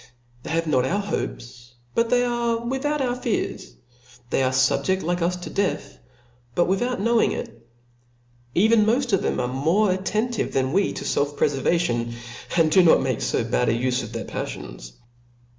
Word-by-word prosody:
They - - -8
have 165 +1 0
not 135 -5 +2
our 180 +11 0
hopes, 120 - -5 0.2
but 230 0 +1
they 245 0 +3
are 235 -1 0
without 270 +5 -2
our 250 -2 0
fears, 215 - -3 0.6
they - - +2
are 130 - +2
liibjeft 130 +9 +1
like 175 +2 -1
us 175 +2 +1
to 180 0 -8
death, 200 -1 -2 0.6
bat 175 - +3
without 240 +6 0
knowing 230 +2 +2
it; 115 - -7 0.9
even 220 +3 +5
moft 240 +2 +1
of 195 - +3
them - - -1
are 125 - 0
more 165 +11 +2
attentive 215 +5 -1
than 130 +1 0
we 195 +2 +2
to - - -6
felf 145 0 0
prefervation, 135 -5 +1 0.4
and 160 -2 +4
do 185 - +6
not 165 -6 +5
make 130 -4 -1
fo - - 0
bad 120 +1 +1
a - - +3
ufe 125 +2 0
of 115 - -7
their 115 -1 -5
paflions. - - -7
175 Hz, 175 wpm, -23 LUFS, -, 0.9 s, do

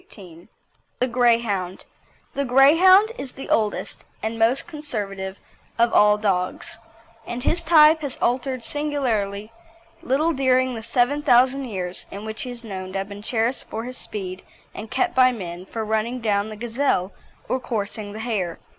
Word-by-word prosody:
CHAPTER - - -9
XVIII 175 -2 -13 0.5
THE 255 - +3
GREYHOUND 230 -7 +1 0.5
The 280 - -1
Greyhound 335 - +6
is 260 - -6
the 270 - -7
oldest 215 -2 0 0.2
and 220 +1 -3
most 235 +7 +3
conservative 205 - -4 0.4
of 235 0 +3
all 210 0 +5
dogs, 190 -4 -2 0.5
and 240 +1 -5
his 340 +4 +1
type 315 -1 +6
has 285 -4 -4
altered 255 0 -1
singularly 230 -9 -1 0.5
little 305 +6 +1
during 260 -2 +2
the 225 - -5
seven 250 +5 +1
thousand 260 +1 +4
years 185 -6 -4
in 200 +2 -8
which 220 0 -5
he 255 - -4
is 240 -1 -8
known 185 -3 -6
to - - -2
have 195 +1 -4
been 200 0 -8
cherished 230 +3 -1
for 225 - -4
his 250 +1 -6
speed, 190 -3 -5 0.3
and 215 +1 -8
kept 355 +8 0
by 255 0 +5
men 180 -5 -7
for 225 -1 -4
running 220 +3 -1
down 210 -2 0
the 215 - -7
gazelle 230 -4 -1 0.4
or 260 - 0
coursing 215 -3 -4
the 220 - -6
hare. 205 -8 -2
230 Hz, 165 wpm, -23 LUFS, 205-260 Hz, 0.5 s, Greyhound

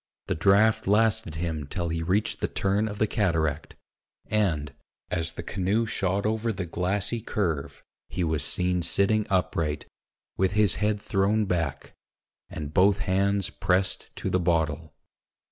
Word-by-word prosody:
The - - -1
draught 100 +7 +3
lasted 110 -3 +2
him 80 -3 -3
till 85 +2 -3
he 80 0 -2
reached 95 +6 0
the - - 0
turn 100 +3 0
of 105 -1 -5
the 110 - +3
cataract; 80 - -1 0.5
and, 80 -10 0 0.4
as 85 -2 -1
the 85 - -6
canoe 100 +6 0
shot 100 -2 -1
over 110 +1 0
the 95 -3 -4
glassy 95 +6 -1
curve, 85 -11 -2 0.3
he 90 - -2
was 80 -2 0
seen 90 0 0
sitting 105 +5 +2
upright, 80 -5 0 0.5
with 95 0 +2
his 105 -3 +3
head 105 0 +1
thrown 105 +2 +1
back, 85 -7 -2 0.6
and 75 -1 -6
both 95 +3 +5
hands 100 0 +1
pressed 95 +1 0
to - - -3
the 90 - +2
bottle. 80 -3 0
95 Hz, 145 wpm, -26 LUFS, 85-105 Hz, 0.6 s, both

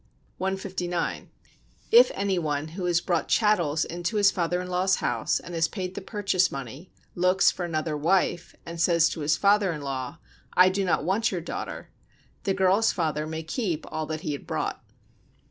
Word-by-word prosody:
159. 185 -2 -3 0.6
If 475 +2 +8
any 195 -2 0
one, 150 -1 -2
who 180 +3 -5
has 175 -1 +2
brought 170 -1 -1
chattels 175 -9 +2
into 175 +5 -4
his 200 -1 +5
father 175 0 -1
in 180 - -5
law's 180 +1 +2
house, - - 0
and 175 - -10
has 165 -1 +2
paid 185 -2 -5
the - - -6
purchase 190 -3 0
money, 135 +5 -7 0.2
looks 185 +2 +3
for 180 - -4
another 155 -2 -2
wife, 175 +2 0
and 170 0 -5
says 170 -1 +4
to - - -6
his 150 0 +1
father 200 -1 +3
in 150 -3 -5
law: 135 +2 -4 0.4
"I 180 +1 +7
do 195 +1 -1
not 180 - +1
want 205 +6 +1
your 185 - -2
daughter," 165 - -6 0.5
the 195 - +2
girl's 190 +4 +3
father 155 -3 -2
may 160 0 -5
keep 170 - -3
all 155 -1 -3
that 155 0 -4
he 155 - -3
had 145 - -6
brought. - - -3
175 Hz, 180 wpm, -26 LUFS, 160-190 Hz, 0.6 s, If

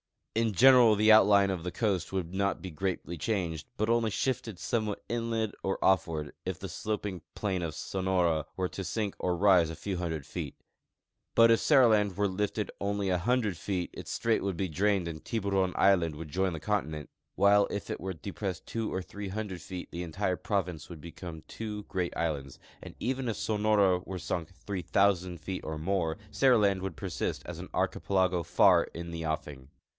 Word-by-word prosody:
In 115 -1 +1
general 125 0 +7
the 110 +1 +5
outline 100 -2 +6
of 90 -3 -4
the 90 - -4
coast 100 -7 0
Avould 90 -2 -3
not 100 +1 0
be 95 - -6
greatly 85 +1 -3
changed, 85 -6 -2
but 110 +1 0
only 115 -1 +3
shifted 115 -3 -2
somewhat 110 +1 -2
inland 115 -2 -1
or 95 - -1
offAvard, 80 -5 +1
if 95 -2 -3
the 95 +1 -7
sloping 100 0 -3
plain 95 -4 -1
of 80 -3 -3
Sonora 90 -5 0
Avere 90 -1 -1
to 95 - -5
sink 100 +3 -2
or 90 -1 0
rise 90 -4 +5
a 80 - -5
few 95 +3 -4
hundred 80 -5 -3
feet; - - -5 0.8
but 115 0 +7
if 115 - +5
Seriland 110 -8 +5
Avere 100 0 -1
lifted 105 +1 -1
only 100 0 -1
a 90 - +2
hundred 110 -2 +1
feet 90 0 -3
its - - -8
strait 115 -1 +1
Avould 95 -2 -2
be 95 0 -1
drained 95 +2 +1
and 80 -2 -6
Tiburon 100 -4 0
island 85 -5 +3
Avould 75 0 -7
join 95 +3 0
the 80 - -4
continent, 80 -8 -2 0.3
Avhile 100 +1 +5
if 100 - -4
it - - -3
Avere 95 -3 -5
depressed 95 0 -5
tAvo 115 -1 -3
or 95 - -2
three 100 +2 -7
hundred 95 -3 -4
feet 90 +1 -7
the 85 - -4
entire 90 +2 -1
province 90 -7 -2
Avould 85 -4 -10
become 85 -1 -8
Iavo 105 +1 -6
great 90 -2 -2
islands, 70 -5 -2 0.2
and - - -10
even 130 +1 -1
if 115 - -1
Sonora 105 -4 +2
Avere 95 0 -6
sunk 85 +1 -4
3,000 90 +1 0
feet 90 +3 -5
or 80 0 -4
more 80 0 -1
Seriland 105 -8 +4
Avould 95 -3 -4
persist 75 - -3
as - - -7
an - - -8
archipelago 95 -2 +1
far 85 +1 +5
in 85 0 -6
the 85 -1 -4
offing. 75 -4 -4
95 Hz, 185 wpm, -30 LUFS, 85-105 Hz, 0.8 s, general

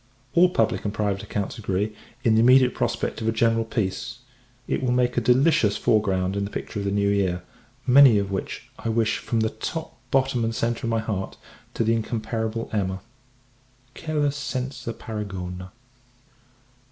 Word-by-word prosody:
All 180 +1 +6
public 115 -9 +1
and 105 - -1
private 100 -2 -1
accounts 105 +3 -4
agree, 105 +1 -1 0.3
in 115 - +4
the 110 - +4
immediate 125 +2 +6
prospect - - -2
of 110 - -2
a - - +3
general 115 0 +2
peace. 115 +1 -3 0.5
It - - -1
will 125 -1 0
make 125 -1 +2
a 120 - +2
delicious 125 -3 +3
foreground 95 -3 +1
in 100 - -1
the 100 - -3
picture 105 - -5
of 100 - -3
the 100 - 0
new 100 0 +1
year; 95 -3 +1 0.4
many 130 -3 +7
of 100 -1 -1
which, 95 - -4
I 115 - -3
wish, 110 -1 +1
from 115 -2 -1
the 110 - +1
top, 160 +9 -5
bottom, 130 -3 +1
and 115 0 -1
centre 115 +1 -1
of - - 0
my 115 -1 +1
heart, 100 -4 -4 0.4
to - - +1
the 115 +1 +2
incomparable 110 0 -2
Emma 95 -2 -1 0.9
quella 150 -3 -1
senza 135 -3 -4
paragona! 95 -5 -6
110 Hz, 170 wpm, -24 LUFS, 100-125 Hz, 0.9 s, many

